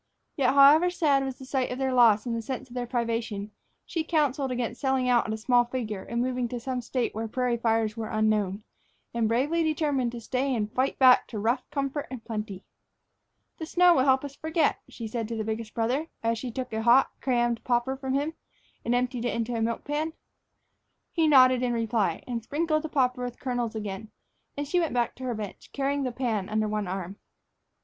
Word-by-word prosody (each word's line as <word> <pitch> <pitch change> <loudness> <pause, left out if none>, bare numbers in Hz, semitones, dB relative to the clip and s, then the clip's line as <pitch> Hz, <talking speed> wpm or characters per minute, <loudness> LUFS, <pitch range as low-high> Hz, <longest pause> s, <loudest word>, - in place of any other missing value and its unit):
Yet, 270 -1 +2
however 295 +5 +7
sad 295 -6 +2
was 265 -1 -4
the 265 - -10
sight 260 -1 -1
of 250 - -3
their 265 -1 0
loss 230 -3 +5
and 235 -2 -2
the 230 - -2
sense 255 +3 -5
of - - -12
their 245 -1 -3
privation, 230 -4 -2 0.3
she 330 -3 -2
counseled 290 -4 +1
against 245 -1 -3
selling 265 -2 +1
out 245 -2 +3
at 220 - -2
a - - -3
small 245 +2 +3
figure 230 -5 -4
and 235 +1 -2
moving 250 -1 -1
to 245 +1 -5
some 250 +1 -3
State 245 +1 -2
where 225 +1 -3
prairie 250 +1 0
fires 225 -2 +1
were 225 -1 -4
unknown, 215 -2 0 0.5
and 230 -2 +1
bravely 275 +9 +1
determined 295 -6 0
to 240 - -5
stay 260 +3 -1
and 215 -1 -2
fight 260 +2 0
back 255 -2 +6
to 225 - -7
rough 225 +5 -1
comfort 280 0 -2
and 255 -4 -8
plenty. 210 -4 -5 0.9
"The 320 - -5
snow 355 +1 +5
will 260 -4 +3
help 265 0 +3
us 280 - -7
to - - -23
forget," 315 -1 +1
she 230 - -7
said 225 0 -3
to 230 - -4
the 220 - -2
biggest 220 0 -4
brother, 250 +7 0 0.2
as 230 0 0
she 255 - -4
took 250 0 -5
a 220 - -1
hot, 240 +4 +5
crammed 240 -3 0
popper 245 +2 0
from 265 0 -3
him 290 +3 -1 0.5
and 235 - +1
emptied 245 -1 -1
it 240 - -1
into 235 +1 -2
a 230 - -1
milk 230 +1 -1
pan. 305 +2 -2 1.0
He 325 -2 +2
nodded 255 -3 +6
in 245 -1 0
reply, 225 -6 0
and 240 -2 -3
sprinkled 310 +6 0
the 315 - -5
popper 250 -3 +1
with 245 -1 -5
kernels 245 -3 -2
again, 210 0 -5 0.5
and 290 0 -3
she 355 +5 +2
went 330 -7 -1
back 240 -1 +1
to 260 - -6
her 245 -2 -2
bench, 210 -3 -7
carrying 280 +1 0
the 255 -2 -1
pan 230 -6 -2
under 215 0 0
one 210 -2 -2
arm. 190 +1 -5
245 Hz, 215 wpm, -27 LUFS, 225-270 Hz, 1.0 s, however